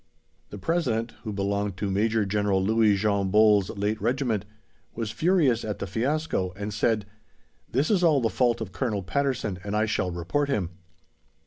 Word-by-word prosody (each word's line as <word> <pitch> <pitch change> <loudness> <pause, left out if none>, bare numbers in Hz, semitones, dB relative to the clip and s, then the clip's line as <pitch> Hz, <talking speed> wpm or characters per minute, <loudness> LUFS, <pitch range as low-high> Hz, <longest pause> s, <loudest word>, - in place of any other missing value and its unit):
The 105 - -8
President 120 - -1
(who 110 - -4
belonged 100 -1 -2
to 100 0 -2
Major 110 +2 +1
General 100 -1 +1
Louis 110 0 +3
Jean 100 -2 0
Bols' 105 -2 +5
late 105 +2 -1
Regiment) 115 -3 0 0.5
was 115 -2 -3
furious 155 -6 +2
at 105 -2 -3
the - - -4
fiasco, 115 - -1
and 100 +1 -5
said, 105 0 +1 0.7
"This 140 - +1
is 190 -4 +2
all 155 -5 +5
the 115 - +1
fault 120 -2 +1
of 105 -4 -5
Colonel 105 -3 -2
Patterson, 130 -4 -1
and 105 0 -3
I 110 - +2
shall 105 -4 -1
report 90 - -1
him." 95 -11 -1
110 Hz, 165 wpm, -26 LUFS, 100-125 Hz, 0.7 s, Bols